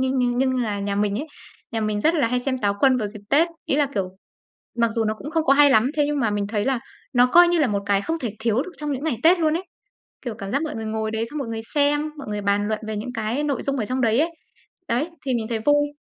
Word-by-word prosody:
nhưng 260 0 +1
nhưng 245 -1 +1
nhưng 260 0 +2
là 205 -3 -2
nhà 200 0 -2
mình 205 +1 0
ấy, 305 - -4 0.5
nhà 225 - -1
mình 215 -1 -1
rất 320 +9 +3
là 285 -7 +2
hay 250 0 0
xem 260 0 -1
Táo 205 -4 +1
Quân 265 -2 +5
vào 215 -4 -1
dịp 210 0 -8
Tết. 325 +4 +4 0.2
Ý 275 - 0
là, 290 - +3
kiểu, 195 -3 -1 0.7
mặc 230 -1 +2
dù 225 -2 0
nó 215 - +1
cũng 285 +8 -8
không 325 -1 +1
có 275 - +5
hay 290 0 +6
lắm, 230 -1 +4
thế 295 - +3
nhưng 295 0 -1
mà 225 -4 +1
mình 205 -1 -1
thấy 210 +1 -1
là 265 -3 +1 0.3
nó 245 -1 +6
coi 350 +7 +7
như 345 -1 +2
là 285 - +3
một 200 -2 -1
cái 200 0 +2
không 325 +8 -3
thể 240 -7 -3
thiếu 225 +1 +1
được 365 - -9
trong 300 -1 -3
những 275 +1 -3
ngày 290 -8 -1
Tết 345 +2 +6
luôn 315 -1 +2
ấy, 370 - -6 0.6
kiểu, 240 -4 -3
cảm 195 -2 -7
giác 280 +7 0
mọi 310 - -3
người 225 - -5
ngồi 220 0 -2
đấy, 220 +1 -1
xong 300 - -5
mọi 270 -5 -4
người 225 0 -3
xem, 295 +1 +2
mọi 275 - -8
người 210 0 -3
bàn 200 +1 +1
luận 215 -1 -1
về 220 -1 -3
những 245 +4 -5
cái 225 +6 -1
nội 280 -4 -1
dung 275 0 -1
ở 220 - -1
trong 255 +4 -2
đấy 230 +2 +3
ấy. 330 - +1 0.6
Đấy, 265 +8 0 0.2
thì 255 - +1
mình 225 -2 -1
thấy 230 - -1
vui. 290 0 +4
245 Hz, 300 wpm, -23 LUFS, 215-290 Hz, 0.7 s, coi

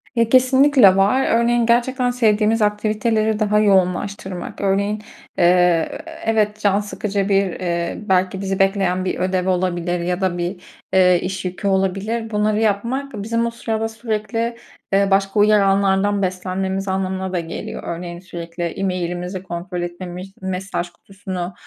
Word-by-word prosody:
Ya, 230 -1 +2
kesinlikle 255 -4 +5
var. 200 +8 +3
Örneğin 235 +1 +3
gerçekten 245 +2 +2
sevdiğimiz 220 -2 +2
aktiviteleri 215 +1 +1
daha 210 -1 +2
yoğunlaştırmak. 190 -1 0
Örneğin, 200 +2 0 0.4
eee, - - +2
e 180 -2 +2 0.2
evet 215 -1 +1
can 205 -1 +2
sıkıcı 205 -1 -2
bir, 195 -2 +1
ııı, 170 +3 -3
belki 185 0 +1
bizi 195 -1 -2
bekleyen 195 -2 +1
bir 185 - -2
ödev 185 0 0
olabilir 175 -1 0
ya 180 +2 -2
da 185 -2 0
bir, 175 +1 -3 0.3
eee, 180 -2 +5
iş 190 0 -4
yükü 185 +2 -3
olabilir. 195 +4 0
Bunları 210 0 +1
yapmak 235 +6 -1
bizim 230 +2 0
o 235 - -2
sırada 225 -1 -2
sürekli, 225 +1 -3 0.4
eee, 200 0 +4
başka 195 +2 +2
uyaranlardan 200 -1 +3
beslenmemiz 190 +1 -2
anlamına 190 0 -2
da 180 - 0
geliyor. 165 -1 -6
Örneğin 170 0 -5
sürekli 170 -1 -7
e-mail'imizi 180 0 -3
kontrol 175 0 -5
etmemiz, 180 +2 -6
mesaj 190 -1 -3
kutusunu, 185 0 -7
195 Hz, 140 wpm, -20 LUFS, 180-215 Hz, 0.4 s, kesinlikle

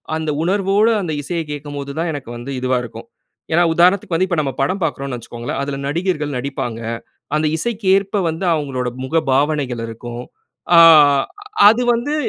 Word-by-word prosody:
அந்த 160 -1 -3
உணர்வோட 195 +3 +2
அந்த 175 -4 -3
இசைய 170 +4 -3
கேட்கும்போதுதான், 145 +2 -5
எனக்கு 140 -5 -7
வந்து 120 +4 -7
இதுவா 130 0 0
இருக்கும். 120 - -10 0.5
ஏன்னா, 175 +2 +4
உதாரணத்துக்கு 180 +1 +3
வந்து 185 +3 +1
இப்ப 175 - -1
நம்ம 135 -3 -3
படம் 185 +8 -1
பார்க்குறோன்னு 140 -5 -3
வச்சிக்கோங்களே! 120 0 -6
அதில 140 -1 -4
நடிகர்கள் 150 -3 -2
நடிப்பாங்க. 125 -3 -4 0.6
அந்த 155 +1 +1
இசைக்கு 220 +2 -3
ஏற்ப 195 +1 -1
வந்து 165 +4 -4
அவுங்களோட 135 -5 -2
முகபாவனைகள் 135 -3 0
இருக்கும். 120 +2 -7 0.5
ஆ - - +8 0.9
அது 230 +3 +3
வந்து 250 +6 -2
150 Hz, 145 wpm, -18 LUFS, 130-180 Hz, 0.9 s, ஆ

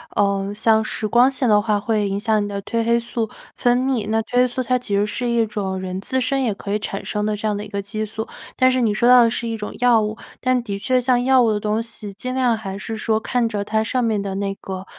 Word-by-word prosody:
呃， 200 0 +1
像 220 +1 +3
是 215 0 -2
光 240 +4 +5
线 260 -3 0
的 210 - +6
话 210 -1 +1
会 210 0 0
影 195 0 -2
响 215 0 +1
你 - - -3
的 200 -1 -4
褪 230 +2 -1
黑 235 0 +3
素 230 -1 -3 0.3
分 245 0 +2
泌， 255 -5 0
那 220 0 +2
褪 225 +2 -8
黑 250 - +5
素 250 +1 -3
它 255 +1 +1
其 235 -5 -3
实 200 +1 +2
是 245 +3 -3
一 235 -1 +2
种 195 -3 -3
人 185 0 -4
自 260 +6 -1
身 270 +1 0
也 230 -4 +1
可 200 +1 -7
以 - - +2
产 200 -1 -5
生 210 -1 -2
的 215 0 0
这 210 +1 -3
样 210 -1 0
的 205 - -5
一 - - -9
个 200 -1 -3
激 215 +2 -4
素。 220 +1 -5 0.3
但 255 0 +4
是 255 0 +1
你 220 -3 +2
说 235 +3 +3
到 250 -1 +8
的 230 - +4
是 235 +1 -3
一 225 -1 -3
种 210 -1 -6
药 240 -2 +5
物。 215 +1 -3 0.2
但 255 -1 +1
的 200 -4 -4
确 255 +5 +1
像 245 0 +2
药 260 0 +5
物 230 -2 +3
的 210 - 0
东 210 +1 0
西 220 -3 -8
尽 255 +6 -5
量 250 -3 +2
还 195 -3 -6
是 225 +2 -5
说 220 0 0
看 240 +1 0
着 205 -2 -2
它 220 +1 0
上 250 +3 -1
面 220 -3 +1
的 195 -1 -4
那 195 0 -2
个 190 -1 -7
220 Hz, 305 characters per minute, -21 LUFS, 205-245 Hz, 0.3 s, 到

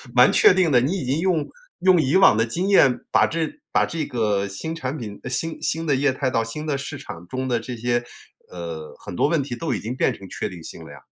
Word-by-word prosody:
蛮 - - +7
确 420 - +6
定 180 -4 +2
的。 125 - +6
你 140 +8 0
已 180 - -4
经 135 +5 0
用 170 -4 0 0.3
用 185 -2 +5
以 140 +2 +1
往 190 - +6
的 115 - +3
经 175 - -2
验 140 -10 +5
把 - - +4
这 165 - -3
把 - - +3
这 160 -2 -3
个 105 -7 0
新 100 +12 -5
产 150 -3 -4
品 105 -6 -7
呃， - - -5
新 150 +6 -1
新 - - -14
新 165 0 -1
的 140 - +3
业 135 0 +2
态 130 0 -1
到 115 -2 +1
新 135 +7 -6
的 150 -3 -1
市 140 +1 -6
场 85 -9 -10
中 130 +6 -3
的 120 -2 +1
这 120 +2 -6
些 120 +1 0 0.5
呃， 85 -3 -7
很 - - -8
多 - - +2
问 150 -2 +1
题 125 -3 -5
都 165 +6 -2
已 - - -2
经 115 +4 -5
变 - - +1
成 95 - -11
确 - - -3
定 90 -4 -10
性 80 - -9
了 - - -11
呀。 70 - -15
130 Hz, 285 characters per minute, -23 LUFS, 115-160 Hz, 0.5 s, 蛮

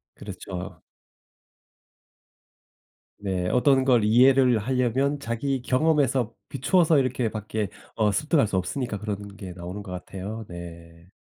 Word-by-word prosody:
그렇죠. 90 -2 -8 2.4
네. 95 -3 -2
어떤 130 +1 +3
걸 125 -4 +4
이해를 125 +3 +5
하려면 130 +4 0
자기 130 +2 -2
경험에서 130 -3 +1 0.2
비추어서 160 +4 +3
이렇게 130 -3 +1
밖에 110 -1 -3 0.3
어 105 -2 +2
습득할 150 +1 +2
수 100 - -1
없으니까 110 +4 -2
그런 100 -1 -5
게 95 -3 -7
나오는 90 +3 -7
것 95 - -9
같아요. 95 +4 -6
네. 85 0 -11
115 Hz, 255 characters per minute, -25 LUFS, 100-130 Hz, 2.4 s, 이해를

